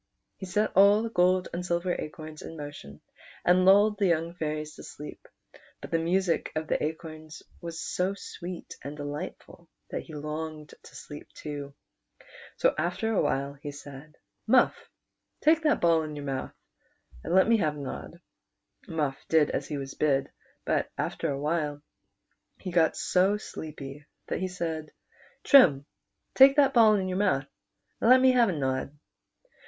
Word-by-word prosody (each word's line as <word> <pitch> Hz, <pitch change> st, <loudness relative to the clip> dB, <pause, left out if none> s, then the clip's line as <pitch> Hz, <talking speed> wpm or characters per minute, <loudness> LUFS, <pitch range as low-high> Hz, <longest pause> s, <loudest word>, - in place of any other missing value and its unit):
He 190 Hz, -, -8 dB
set 210 Hz, +4 st, 0 dB
all 200 Hz, +3 st, +6 dB
the 230 Hz, -, -4 dB
gold 180 Hz, -1 st, +3 dB
and 175 Hz, +1 st, -3 dB
silver 175 Hz, 0 st, 0 dB
acorns 155 Hz, -1 st, -7 dB
in 165 Hz, -, -9 dB
motion, 145 Hz, -, -9 dB, 0.4 s
and 180 Hz, +1 st, +4 dB
lulled 205 Hz, +2 st, +5 dB
the 200 Hz, -, +3 dB
young 170 Hz, 0 st, 0 dB
fairies 155 Hz, -2 st, -4 dB
to -, -, -10 dB
sleep; 150 Hz, -, -10 dB, 0.5 s
but -, -, -10 dB
the 165 Hz, -, +2 dB
music 175 Hz, +1 st, 0 dB
of 155 Hz, 0 st, -1 dB
the -, -, 0 dB
acorns 155 Hz, 0 st, -6 dB, 0.2 s
was 170 Hz, -1 st, -6 dB
so 185 Hz, +2 st, -1 dB
sweet 180 Hz, -2 st, -8 dB
and 145 Hz, +2 st, -7 dB
delightful 145 Hz, +3 st, -7 dB, 0.2 s
that -, -, -3 dB
he 160 Hz, -, -11 dB
longed 155 Hz, +1 st, -5 dB
to -, -, -16 dB
sleep 145 Hz, -1 st, -10 dB
too; 145 Hz, -2 st, -7 dB, 0.8 s
so -, -, +3 dB
after 225 Hz, -1 st, -1 dB
a -, -, +2 dB
while 140 Hz, +1 st, -1 dB
he 145 Hz, +1 st, -8 dB
said, 145 Hz, +1 st, -11 dB, 0.2 s
" -, -, -51 dB
Muff, -, -, +3 dB, 0.5 s
take 320 Hz, +1 st, +4 dB
that 305 Hz, -2 st, +2 dB
ball 165 Hz, -1 st, +4 dB
in 155 Hz, -1 st, -6 dB
your 145 Hz, -1 st, -6 dB
mouth, 135 Hz, -1 st, -4 dB, 0.7 s
and -, -, -1 dB
let 190 Hz, -, +6 dB
me 230 Hz, 0 st, +5 dB
have 155 Hz, -7 st, 0 dB
a -, -, -7 dB
nod." 140 Hz, -, -7 dB, 0.7 s
Muff 150 Hz, -4 st, -2 dB
did 160 Hz, -2 st, +4 dB
as -, -, -3 dB
he 150 Hz, -, -4 dB
was 135 Hz, -1 st, -6 dB
bid; 140 Hz, -2 st, +1 dB, 0.3 s
but -, -, 0 dB
after -, -, -2 dB
a 140 Hz, -1 st, -2 dB
while 150 Hz, -1 st, -1 dB, 0.8 s
he 185 Hz, -, -6 dB
got 165 Hz, -2 st, +3 dB
so 190 Hz, +3 st, +2 dB
sleepy 150 Hz, -6 st, -9 dB, 0.2 s
that -, -, -1 dB
he 185 Hz, -, -1 dB
said, 165 Hz, -4 st, -4 dB, 0.5 s
"Trim, 150 Hz, -, +6 dB, 0.5 s
take 270 Hz, +1 st, +8 dB
that 280 Hz, -2 st, +4 dB
ball 220 Hz, -3 st, +6 dB
in 190 Hz, -2 st, -1 dB
your 185 Hz, 0 st, -2 dB
mouth, 185 Hz, -10 st, +1 dB, 0.5 s
and 230 Hz, -, +2 dB
let 255 Hz, +1 st, +8 dB
me 260 Hz, 0 st, +6 dB
have 240 Hz, -4 st, +4 dB
a -, -, 0 dB
nod." 135 Hz, 0 st, -2 dB
160 Hz, 170 wpm, -28 LUFS, 150-190 Hz, 0.8 s, take